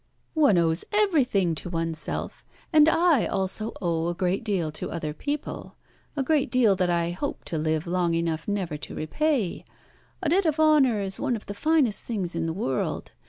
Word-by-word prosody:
"One 290 - +4
owes 165 0 +2
everything 270 - +2
to 160 - -5
oneself, 165 -2 -3 0.3
and 310 0 +7
I 325 -5 +3
also 195 +3 -2
owe 165 -2 -1
a 175 - -2
great 180 +3 -1
deal 190 -8 -1
to 150 - -4
other 155 -3 -4
people 290 - -5 0.4
a 275 - +1
great 295 -1 +1
deal 235 -6 +4
that 180 -1 +1
I 170 -1 +1
hope 275 +11 -4
to 160 - -3
live 155 0 0
long 175 -1 0
enough 165 -1 -2
never 190 -7 -2
to - - -8
repay. 240 - -1 0.6
A 320 - +1
debt 365 +2 +3
of 310 0 0
honour 295 -8 +4
is 195 -1 -3
one 260 -4 0
of 215 - -8
the 200 - -5
finest 275 -2 +1
things 195 -7 -3
in 165 0 -2
the - - -1
world. 135 - -2
195 Hz, 185 wpm, -26 LUFS, -, 0.6 s, and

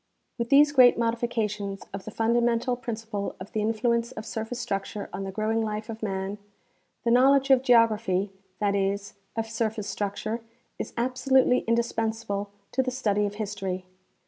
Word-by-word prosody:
With 235 0 -1
these 290 +1 +6
great 255 -4 +7
modiflcations 225 -4 -1
of 195 -1 -6
the - - -5
fundamental 235 +2 +1
principle 225 -5 -4
of 185 - -9
the 215 - -1
influence 235 +2 +1
of 215 - -7
surface 225 +2 -4
structure 200 -2 -4
on 195 - -4
the 195 - -4
growing 215 +3 0
life 215 +1 -4
of 225 0 -6
man, 195 -1 -3 0.6
the 235 - +2
knowledge 270 +2 +5
of 260 -2 +6
geography 220 -6 +3
— 185 - -41
that 205 -1 +1
is, 200 0 -1 0.2
of 225 -1 -1
surface 220 -2 -2
structure 205 +3 -3 0.2
— - - -43
is - - -4
abso 255 +2 -2
lutely 255 -1 +6
indispensable 225 -3 -1 0.2
to 265 - +2
the 260 - -1
study 210 -5 +1
of 205 - -7
history. 195 -3 -4
225 Hz, 170 wpm, -27 LUFS, 205-240 Hz, 0.6 s, great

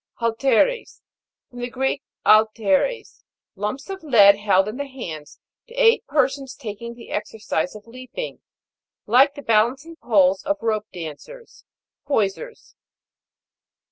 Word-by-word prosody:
HALTE'RES. 250 - 0 0.5
From 245 - -10
the 245 0 -4
Greek, 265 +3 -1 0.2
'/f 215 +1 +6
eres, 220 - 0 0.3
lumps 210 +7 -4
of 385 -1 -6
lead 205 -9 +6
held 200 -1 +2
in 215 +3 -5
the 285 0 -4
hands 165 - -8 0.3
to 485 - -14
aid 480 -2 +4
persons 270 -2 0
taking 235 -1 -7
the 235 - -13
exercise 210 -4 -3
of 210 - -11
leaping, 255 - -8 0.6
like 265 +6 +4
the 285 - -9
balancing 255 +9 +1
poles 195 - +3
of 300 0 -1
rope 215 -2 -1
dancers. 180 - -10 0.4
Poisers. 275 - -2
235 Hz, 125 wpm, -22 LUFS, 210-280 Hz, 0.6 s, f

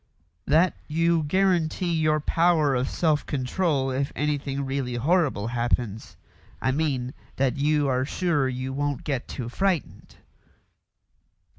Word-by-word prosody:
"That 160 +3 +4
you 165 +1 +2
guarantee 175 +1 +1
your 155 -1 +2
power 160 -2 +2
of 130 0 0
self 155 -3 +1
control 135 0 -1
if 135 +2 -1
anything 140 -2 -1
really 135 -2 -2
horrible 140 - +1
happens. 120 -2 -2 0.4
I 130 - +1
mean 130 -4 -1 0.2
that 135 -1 0
you 145 0 +2
are 130 -1 +1
sure 150 -2 0
you 130 +1 -4
won't 145 -1 -2
get 135 -5 -3
too 120 - -5
frightened." 180 +4 -2
145 Hz, 125 wpm, -25 LUFS, 130-160 Hz, 0.4 s, That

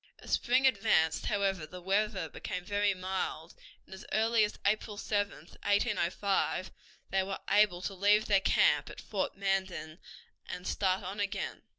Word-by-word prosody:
As - - -11
spring 255 +2 +3
advanced, 200 -10 +2
however, 195 -6 0
the 180 - -9
weather 195 -1 0
became 180 +3 -5
very 205 0 +1
mild, 185 -3 -4 0.3
and - - -13
as 190 - -9
early 225 +1 +3
as 210 - -2
April 210 0 0
7, 205 -1 0
1805, 195 +1 0 0.4
they 195 - +2
were 190 +1 -3
able 205 -4 +3
to 195 - -3
leave 205 +3 +3
their 200 -2 +3
camp - - +3
at - - -10
Fort 195 -2 -3
Manden 190 -4 -2 0.5
and 180 - -6
start 190 -1 0
on 195 +3 -6
again. 200 -1 -3
195 Hz, 155 wpm, -31 LUFS, 185-210 Hz, 0.5 s, spring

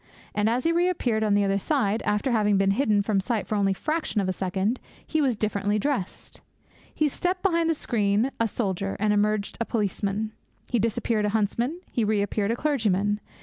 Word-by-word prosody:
And 210 +1 +2
as 245 +2 0
he 330 - +2
reappeared 335 -11 +1
on 210 -2 +2
the 205 - +3
other 195 0 +1
side, 225 -4 0
after 210 +5 +1
having 210 -3 +3
been 195 0 +3
hidden 210 -2 +2
from 200 -1 +1
sight 220 +1 -1
for - - -4
only 200 -2 +2
a - - -10
fraction 310 - -1
of 195 - 0
a 185 - 0
second, 190 +6 -1 0.3
he 315 - 0
was 260 -5 +2
differently 205 -1 0
dressed. 215 -4 -3 0.5
He 305 - +1
stepped 360 +5 -2
behind 335 -4 +2
the 325 - +2
screen 215 -1 +1
a 230 - +2
soldier, 195 -3 -2
and 210 0 +2
emerged 210 0 0
a - - +1
policeman. 210 -1 -1 0.4
He 240 - +2
disappeared 220 0 0
a - - +1
huntsman, 235 - -1
he 235 - 0
reappeared 205 -1 0
a 230 - +1
clergyman. 210 -8 +1
215 Hz, 195 wpm, -26 LUFS, 200-250 Hz, 0.5 s, the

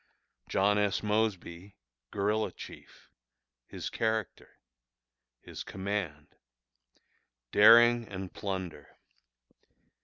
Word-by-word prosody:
John 105 +2 +2
S. 105 0 0
Mosby, 100 -3 -2 0.3
Guerilla 105 +2 -1
Chief. - - -13 0.6
His - - -6
Character. 110 -4 -3 0.8
His - - -8
Command. 95 -7 -4 1.2
Daring 115 +2 +6
and 95 -1 -7
Plunder. 95 -4 -6
105 Hz, 70 wpm, -30 LUFS, 95-110 Hz, 1.2 s, Daring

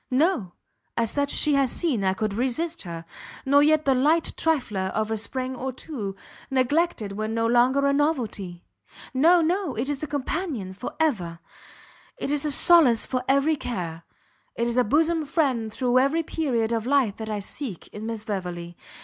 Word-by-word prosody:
No, 255 - +1 0.4
as 230 -2 +1
such 285 -1 0
she 300 0 +2
has 275 -3 +3
seen 280 - 0
I 190 0 +1
could 215 0 -2
resist 290 +9 -2
her; 170 -2 -7 0.4
nor 285 +2 +5
yet 310 +1 +3
the 270 - +4
light 305 +6 +2
trifler 245 -12 0
of 220 0 -1
a - - +1
spring 255 +4 -4
or 260 +1 -3
two, 235 -7 -6 0.3
neglected 265 - +1
when 215 +2 -3
no 230 0 +1
longer 250 +4 +3
a 280 - +3
novelty; 230 - -1 0.5
no, 335 +7 +5
no! 345 -2 0
it 245 +6 -2
is 285 -2 -2
a 305 - -3
companion 285 - -3
for 200 +6 -6
ever, 195 - 0 0.8
it 285 - -3
is 295 0 0
a 300 - 0
solace 290 -7 +5
for 255 -1 -2
every 275 +4 +3
care, 175 - -5 0.5
it 235 - 0
is 235 0 -1
a 250 - +5
bosom 320 +7 +2
friend 270 -7 0
through 250 +2 +2
every 285 +5 +2
period 250 -9 -1
of 230 0 -1
life 260 -7 +2
that 220 -1 -6
I 215 - -2
seek 205 - -5
in 215 +1 -7
Miss 225 -2 -5
Beverley! 175 -5 -4
255 Hz, 180 wpm, -25 LUFS, 215-295 Hz, 0.8 s, nor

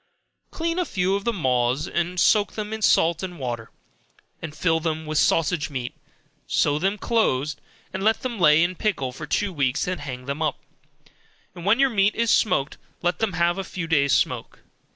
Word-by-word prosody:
Clean 335 +1 -2
a - - +2
few 185 - 0
of 200 0 -2
the 235 - +2
maws, 130 - 0
and 175 +1 -2
soak 205 +3 +3
them 215 0 -5
in 220 - -5
salt 165 -5 +3
and 180 -2 -6
water, 120 -5 -4 0.7
and 155 -2 -7
fill 165 -1 +2
them 160 -1 -3
with 155 0 0
sausage 165 -1 +2
meat, 125 -4 -4 0.5
sew 145 0 +2
them 195 +5 0
close, 150 - 0 0.4
let 205 +4 +1
them 240 -4 -4
lay 150 -1 +6
in 175 +1 0
pickle 170 - -1
for 150 +4 -8
two 200 +6 0
weeks 140 -2 0
then 180 0 -3
hang 125 -3 -7
them 140 +3 -4
up, 155 -3 0 1.0
and 175 -1 -9
when 225 +5 +4
your 275 -1 +4
meat 200 -1 +2
is 230 -1 +1
smoked, 145 -9 +1 0.2
let 175 0 0
them 220 -4 0
have 170 +2 +1
a - - -2
few 180 -2 -5
days 140 -4 +2
smoke. - - 0
170 Hz, 190 wpm, -24 LUFS, 145-200 Hz, 1.0 s, lay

